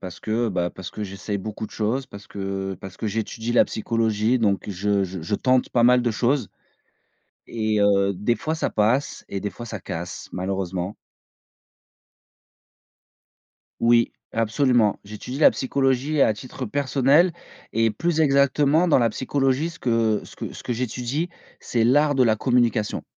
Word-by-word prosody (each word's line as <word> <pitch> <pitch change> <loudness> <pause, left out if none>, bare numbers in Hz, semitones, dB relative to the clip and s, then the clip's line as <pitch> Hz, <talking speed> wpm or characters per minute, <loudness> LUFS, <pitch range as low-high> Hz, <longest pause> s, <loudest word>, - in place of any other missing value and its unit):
parce 90 -2 -8
que, 115 +2 0
bah, 90 -3 -1
parce 95 -1 -8
que 105 - -6
j'essaye 100 +1 -4
beaucoup 110 +2 -5
de - - -20
choses, 120 +5 -1
parce 100 -4 -12
que 95 -1 -4
parce 95 -2 -9
que 110 - -4
j'étudie 115 +2 -3
la - - +5
psychologie, 110 +1 0
donc 100 -3 0
je 100 +1 0
je 95 -1 -6
je 85 +6 -2
tente 130 +3 +2
pas 120 - +2
mal 125 +1 +5
de 120 - +1
choses. 120 0 0 1.0
Et 110 -2 -1
heu, 100 -1 +3
des 105 +6 0
fois 155 +1 -3
ça - - -1
passe 115 +7 0
et 100 - -4
des 105 - -3
fois 120 - -9
ça 110 -3 -6
casse, 85 +1 -6
malheureusement. 95 0 -3 2.9
Oui, 115 0 +4 0.2
absolument. 115 -1 +2
J'étudie 105 +6 -7
la 155 - +7
psychologie 135 +2 0
à 110 - +4
titre 130 +3 -7
personnel 140 - +3 0.4
et 115 0 +2
plus 160 +9 -1
exactement 145 +3 +3
dans 145 - +5
la 120 - +3
psychologie, 135 +5 0
ce 165 - -13
que 115 -3 +1
ce - - -13
que - - -6
ce - - -10
que - - -2
j'étudie, 125 +6 -2 0.3
c'est 115 -2 0
l'art 145 +3 +3
de 130 - +5
la 110 -2 +4
communication. 120 -2 +1
115 Hz, 165 wpm, -23 LUFS, 105-130 Hz, 2.9 s, la